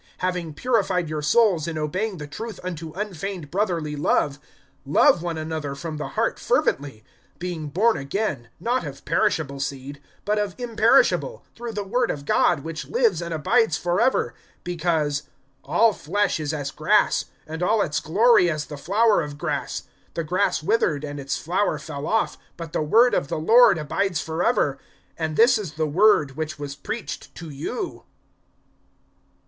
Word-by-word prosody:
(22)Having 180 Hz, -4 st, -2 dB
purified 195 Hz, -, 0 dB
your 155 Hz, -1 st, -3 dB
souls 175 Hz, 0 st, +3 dB
in 165 Hz, -2 st, -3 dB
obeying 185 Hz, +7 st, -2 dB
the 150 Hz, -, -6 dB
truth 220 Hz, +10 st, -7 dB
unto 165 Hz, -3 st, -5 dB
unfeigned 190 Hz, -5 st, -5 dB
brotherly 170 Hz, -6 st, -1 dB
love, 145 Hz, -1 st, +1 dB, 0.4 s
love 150 Hz, +4 st, +4 dB
one 170 Hz, -2 st, -3 dB
another 155 Hz, -3 st, -4 dB
from 155 Hz, +1 st, -6 dB
the 150 Hz, -, -4 dB
heart -, -, +1 dB
fervently; 135 Hz, -6 st, 0 dB, 0.4 s
(23)being 170 Hz, -4 st, -4 dB
born 220 Hz, +8 st, +3 dB
again, 140 Hz, -, -3 dB
not 245 Hz, +2 st, 0 dB
of -, -, -8 dB
perishable 155 Hz, -10 st, 0 dB
seed, 140 Hz, +1 st, -5 dB, 0.2 s
but 210 Hz, +1 st, +1 dB
of 205 Hz, -2 st, -2 dB
imperishable, 245 Hz, -, +2 dB
through 235 Hz, 0 st, -6 dB
the 205 Hz, -2 st, -3 dB
word 245 Hz, +6 st, 0 dB
of 140 Hz, -1 st, -4 dB
God, 160 Hz, +1 st, +3 dB
which 160 Hz, +1 st, -6 dB
lives 470 Hz, -, +2 dB
and 170 Hz, 0 st, -5 dB
abides 170 Hz, +3 st, +2 dB
forever. 175 Hz, -, +1 dB, 0.3 s
(24)Because, 160 Hz, -4 st, 0 dB, 0.4 s
All 215 Hz, +10 st, +3 dB
flesh 200 Hz, +3 st, 0 dB
is 150 Hz, -1 st, -2 dB
as 145 Hz, -3 st, -3 dB
grass, -, -, +2 dB, 0.2 s
And 160 Hz, +2 st, -6 dB
all 205 Hz, +3 st, +3 dB
its 150 Hz, 0 st, -1 dB
glory 195 Hz, +4 st, +4 dB
as 155 Hz, -2 st, -2 dB
the 150 Hz, -, -8 dB
flower 205 Hz, +7 st, +3 dB
of 145 Hz, -2 st, -6 dB
grass. -, -, -3 dB, 0.3 s
The 165 Hz, -, -1 dB
grass 180 Hz, 0 st, 0 dB
withered, 155 Hz, -7 st, +1 dB
and 145 Hz, -1 st, -5 dB
its 140 Hz, 0 st, -2 dB
flower 185 Hz, +5 st, 0 dB
fell 145 Hz, -1 st, -6 dB
off; 225 Hz, -, 0 dB, 0.2 s
(25)But 165 Hz, -2 st, -7 dB
the -, -, -1 dB
word 230 Hz, +11 st, +4 dB
of 140 Hz, -, +1 dB
the -, -, -3 dB
Lord 225 Hz, +6 st, +6 dB
abides 170 Hz, +3 st, -1 dB
forever. 160 Hz, -, 0 dB, 0.4 s
And 160 Hz, -1 st, -3 dB
this 235 Hz, 0 st, +6 dB
is 185 Hz, -8 st, -6 dB
the 155 Hz, +1 st, -1 dB
word 155 Hz, -2 st, +4 dB
which 155 Hz, 0 st, -4 dB
was 145 Hz, -1 st, -6 dB
preached 220 Hz, +10 st, -6 dB
to 165 Hz, -3 st, -8 dB
you. 160 Hz, -, -5 dB
165 Hz, 165 wpm, -24 LUFS, 150-210 Hz, 0.4 s, Lord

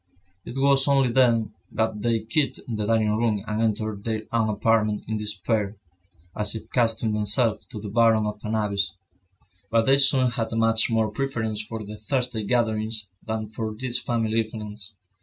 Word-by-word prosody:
It -, -, -8 dB
was 135 Hz, 0 st, +3 dB
only 135 Hz, -2 st, +3 dB
then 120 Hz, -3 st, +3 dB, 0.2 s
that 110 Hz, -1 st, -1 dB
they 115 Hz, -1 st, +1 dB
quitted 130 Hz, +4 st, 0 dB
the 105 Hz, -3 st, -2 dB
dining 110 Hz, -2 st, +2 dB
room 110 Hz, -3 st, 0 dB
and 110 Hz, 0 st, -2 dB
entered 110 Hz, -2 st, -1 dB
their 110 Hz, -1 st, -2 dB
own 115 Hz, -2 st, +1 dB
apartment 105 Hz, 0 st, +1 dB
in 110 Hz, -, -2 dB
despair, 105 Hz, 0 st, -2 dB, 0.6 s
as 105 Hz, +1 st, 0 dB
if 110 Hz, -, -8 dB
casting 115 Hz, -2 st, +1 dB
themselves 105 Hz, +2 st, +1 dB
to 110 Hz, -, -7 dB
the 105 Hz, -, -7 dB
bottom 110 Hz, 0 st, +3 dB
of 105 Hz, 0 st, -5 dB
an 110 Hz, +1 st, -2 dB
abyss. 100 Hz, -3 st, 0 dB, 0.7 s
But 115 Hz, 0 st, +3 dB
they 135 Hz, +1 st, +5 dB
soon 135 Hz, -3 st, +4 dB
had 115 Hz, -2 st, -2 dB
much 115 Hz, 0 st, +3 dB
more 110 Hz, -2 st, +1 dB
preference 110 Hz, -3 st, -2 dB
for 110 Hz, 0 st, -6 dB
the 105 Hz, +1 st, -8 dB
Thursday 125 Hz, +1 st, -1 dB
gatherings, 110 Hz, -1 st, +2 dB, 0.2 s
than 110 Hz, -1 st, -4 dB
for 110 Hz, -1 st, -4 dB
these 125 Hz, +2 st, -1 dB
family 115 Hz, -1 st, 0 dB
evenings. 105 Hz, -2 st, -5 dB
110 Hz, 170 wpm, -25 LUFS, 105-115 Hz, 0.7 s, they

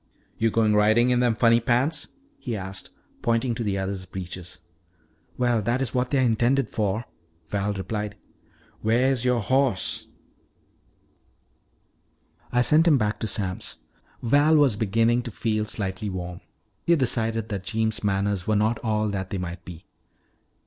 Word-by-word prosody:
"Yo' 115 Hz, -, +3 dB
goin' 110 Hz, -1 st, +2 dB
ridin' 110 Hz, +4 st, +4 dB
in 125 Hz, -, +3 dB
them 120 Hz, -2 st, +2 dB
funny 115 Hz, +2 st, +4 dB
pants?" 125 Hz, +7 st, +1 dB, 0.3 s
he 115 Hz, -3 st, -3 dB
asked, 95 Hz, 0 st, -6 dB, 0.3 s
pointing 115 Hz, +1 st, +1 dB
to 115 Hz, -, -3 dB
the 100 Hz, -2 st, -1 dB
other's 95 Hz, -1 st, -3 dB
breeches. 90 Hz, -1 st, -8 dB, 0.8 s
"Well, 120 Hz, -3 st, +2 dB
that's 120 Hz, +2 st, 0 dB
what 125 Hz, 0 st, 0 dB
they 140 Hz, -, +1 dB
are -, -, +3 dB
intended 120 Hz, +2 st, +2 dB
for," 105 Hz, +1 st, -1 dB, 0.4 s
Val 100 Hz, +2 st, -1 dB
replied. 105 Hz, +2 st, -4 dB, 0.7 s
"Wheah's 125 Hz, +3 st, +2 dB
youah 125 Hz, -2 st, +2 dB
hoss?" 130 Hz, -5 st, 0 dB, 2.4 s
"I 125 Hz, 0 st, +3 dB
sent 155 Hz, +5 st, +4 dB
him 150 Hz, -4 st, +6 dB
back 105 Hz, -2 st, -1 dB
to 110 Hz, -, -2 dB
Sam's." 95 Hz, -3 st, -4 dB, 0.5 s
Val 145 Hz, +6 st, +4 dB
was 145 Hz, -7 st, +4 dB
beginning 115 Hz, +3 st, +2 dB
to 120 Hz, -, -6 dB
feel 110 Hz, -1 st, -1 dB
slightly 100 Hz, -1 st, -3 dB
warm. 90 Hz, -2 st, -6 dB, 0.4 s
He 170 Hz, -, +4 dB
decided 115 Hz, -5 st, 0 dB
that 100 Hz, -3 st, -4 dB
Jeems' 110 Hz, -1 st, -1 dB
manners 100 Hz, -2 st, 0 dB
were 110 Hz, -, +2 dB
not 110 Hz, +3 st, +1 dB
all 110 Hz, -2 st, +1 dB
that 95 Hz, -2 st, -3 dB
they 100 Hz, -, -3 dB
might 90 Hz, -1 st, -5 dB
be. 90 Hz, -2 st, -11 dB
110 Hz, 150 wpm, -25 LUFS, 100-120 Hz, 2.4 s, him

